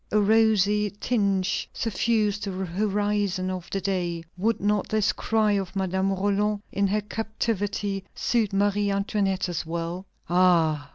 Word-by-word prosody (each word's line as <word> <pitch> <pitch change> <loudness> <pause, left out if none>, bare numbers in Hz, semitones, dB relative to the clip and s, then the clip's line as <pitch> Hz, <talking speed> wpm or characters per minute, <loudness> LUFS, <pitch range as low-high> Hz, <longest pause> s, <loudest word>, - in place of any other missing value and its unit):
A 215 - +3
rosy 210 -1 +3
tinge 200 -6 0
suffused 215 -1 0
the 190 -1 -3
horizon 200 0 0
of 185 -2 -6
the 195 - -2
day." 175 -4 -2
Would 220 +5 0
not 205 0 0
this 215 -2 +2
cry 220 -1 +1
of 195 -1 -1
Madame 190 0 0
Roland 205 +2 0
in 200 0 +1
her 210 +2 0
captivity 205 -2 -2
suit 225 -4 +1
Marie 205 +1 +1
Antoinette 195 -1 0
as 175 -2 -3
well? 170 +3 -4 0.2
"Ah! 165 -5 +3
200 Hz, 135 wpm, -25 LUFS, 185-210 Hz, 0.2 s, A